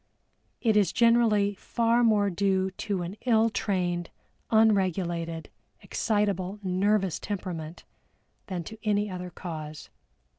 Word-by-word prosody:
It 220 -3 +2
is 200 -5 +4
generally 230 -4 +4
far 235 +4 +1
more 210 -3 +3
due 190 +1 +1
to 190 -1 -3
an 180 +5 -6
ill 225 -1 +4
trained, 175 -5 -1 0.4
unregulated, 180 -6 +1 0.3
excitable, 200 -3 -1
nervous 190 0 +1
temperament 175 -5 -5 0.6
than 180 -3 -3
to 220 +6 -10
any 205 -1 +1
other 180 0 -5
cause. 155 -4 -7
195 Hz, 110 wpm, -27 LUFS, 180-215 Hz, 0.6 s, is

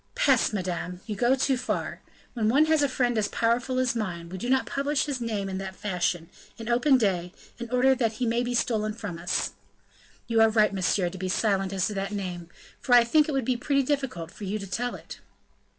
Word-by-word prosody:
"Peste! - - +3
madame, 180 -3 -3
you 215 - -4
go 240 +6 +3
too 270 0 +1
far! 250 0 -3 0.3
When 220 -3 0
one 280 +6 +5
has 315 -1 +3
a 285 - +2
friend 245 -2 0
as 205 - +1
powerful 240 +3 0
as 255 -2 +1
mine, 175 -6 -4
we 185 +1 -6
do 240 - -3
not 265 0 +3
publish 280 +1 0
his 275 -4 -3
name 215 -4 -2
in 190 0 -4
that 190 -1 -6
fashion, 175 -4 -2 0.3
in 225 -1 -8
open 255 +3 +4
day, 180 -6 0 0.3
in 235 -1 -6
order 250 +2 +4
that 230 -4 0
he 245 +3 -2
may 235 +1 +1
be 245 0 -2
stolen 215 -3 0
from 205 -6 -6
us." 175 +2 -1 0.7
"You 230 -1 +2
are 225 - +6
right, 215 -2 +3
monsieur, 185 -1 +1
to 190 - -8
be 185 0 -3
silent 195 -1 +1
as 190 -2 0
to 215 - -2
that 195 +1 -3
name; 180 -4 -5 0.3
for 245 - +3
I 240 - +8
think 300 +6 +3
it - - 0
would 270 -3 0
be 255 0 +1
pretty 275 +2 +1
difficult 255 - -2
for - - -11
you 200 +3 -2
to 200 - -6
tell 245 +5 -3
it." - - -10
225 Hz, 230 wpm, -27 LUFS, 195-255 Hz, 0.7 s, I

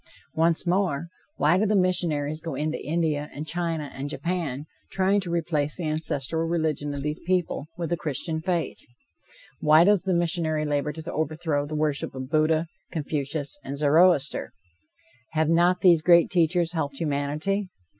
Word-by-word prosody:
Once 165 +2 +2
more: 175 -4 0 0.3
Why 165 +5 +3
do 215 - +2
the 210 - +2
missionaries 160 -5 0
go 160 -4 -5
into 155 +3 -2
India 155 -2 -1
and 150 - -5
China 165 -3 -2
and 140 +2 -5
Japan 160 -5 -3 0.2
trying 195 +1 +2
to 180 - -6
replace 155 -3 0
the 170 -4 -3
ancestral 155 0 0
religion 155 -4 -1
of 140 - -5
these 150 +1 -3
people 175 -4 -1
with 170 -1 -4
the 175 - +1
Christian 160 +2 -3
faith? 170 -4 -2 0.8
Why 155 +2 +6
does 200 0 +4
the 185 -1 0
missionary 165 -3 0
labor 145 0 0
to 160 +2 -7
overthrow 155 -1 -1
the 155 - -5
worship 150 -3 -1
of 130 +1 -6
Buddha, 155 +1 +2 0.3
Confucius 150 +1 -3
and 140 +1 -5
Zoroaster? 150 0 +3 0.8
Have 160 0 +1
not 175 +2 +3
these 170 -4 +6
great 170 +1 +5
teachers 170 -1 +2
helped 145 -5 -3
humanity? 155 +7 -1
160 Hz, 155 wpm, -25 LUFS, 150-175 Hz, 0.8 s, Why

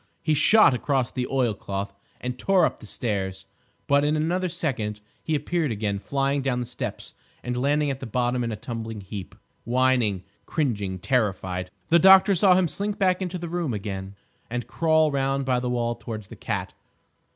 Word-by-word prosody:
He 155 -2 +2
shot 180 +4 +6
across 130 -1 0
the 125 -1 -2
oilcloth, 100 -6 -2 0.3
and 125 0 -5
tore 190 -3 +4
up - - -2
the 110 - -12
stairs, 95 -5 -3 0.4
but 140 0 +3
in 150 +1 +2
another 175 +4 0
second 125 -11 -3 0.2
he 160 - -1
appeared 150 0 -1
again, 100 -2 -2
flying 140 +4 0
down 130 -2 0
the 125 - -2
steps - - -5 0.3
and 125 0 -2
landing 145 +3 +1
at 135 - -5
the 130 - -6
bottom 125 +2 0
in 115 - -2
a - - -2
tumbling 115 -1 -6
heap, 95 -2 -8 0.3
whining, 120 -6 +2 0.2
cringing, 105 - -1
terrified. 95 -5 -1 0.2
The 170 - +6
doctor 190 +3 +7
saw 185 0 +5
him 185 -1 +3
slink 205 +5 -3
back 185 -1 +2
into 180 -1 -3
the 170 0 -5
room 165 -8 -2
again 95 -1 -5 0.3
and 120 0 -3
crawl 160 -2 +2
round 135 0 0
by 125 -1 +2
the 125 0 -2
wall 120 -1 0
towards 110 -4 -7
the - - -9
cat. - - -4
130 Hz, 180 wpm, -25 LUFS, 110-155 Hz, 0.4 s, doctor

